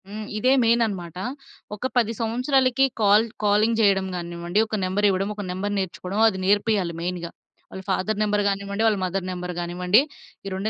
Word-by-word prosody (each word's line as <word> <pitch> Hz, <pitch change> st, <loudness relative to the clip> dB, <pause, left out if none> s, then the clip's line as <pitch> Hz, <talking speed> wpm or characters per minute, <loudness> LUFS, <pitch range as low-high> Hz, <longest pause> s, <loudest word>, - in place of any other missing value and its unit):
హ్మ్. 210 Hz, +1 st, -7 dB
ఇదే 255 Hz, +5 st, +2 dB
మెయిన్ 235 Hz, +1 st, +3 dB
అనమాట. 180 Hz, -5 st, -6 dB, 0.6 s
ఒక 230 Hz, +5 st, -3 dB
10 230 Hz, -2 st, +2 dB
సంవత్సరాలకి 255 Hz, +3 st, +2 dB, 0.2 s
కాల్ 210 Hz, +2 st, +5 dB, 0.2 s
కాలింగ్ 210 Hz, +2 st, +3 dB
చేయడం 195 Hz, -2 st, +3 dB
గానివ్వండి, 170 Hz, +2 st, -3 dB
ఒక 215 Hz, -, -3 dB
నెంబర్ 190 Hz, +3 st, 0 dB
ఇవ్వడం, 195 Hz, +1 st, 0 dB
ఒక 205 Hz, -, -5 dB
నంబర్ 200 Hz, +3 st, -3 dB
నేర్చుకోవడం 190 Hz, +2 st, -4 dB
అది 200 Hz, -4 st, 0 dB
నేర్పియాలి 205 Hz, -3 st, +1 dB
మెయిన్‌గా. 175 Hz, -1 st, -4 dB, 0.4 s
వాళ్ళ 190 Hz, -, -7 dB
ఫాదర్ 195 Hz, +3 st, 0 dB
నంబర్ 210 Hz, -1 st, +1 dB
గానివ్వండి, 200 Hz, +1 st, -2 dB
వాళ్ళ 215 Hz, -2 st, +2 dB
మదర్ 185 Hz, 0 st, -3 dB
నెంబర్ 180 Hz, 0 st, -5 dB
కానివ్వండి, 180 Hz, +5 st, +2 dB, 0.4 s
ఈ -, -, -5 dB
2 195 Hz, +3 st, -2 dB
200 Hz, 170 wpm, -24 LUFS, 185-215 Hz, 0.6 s, కాల్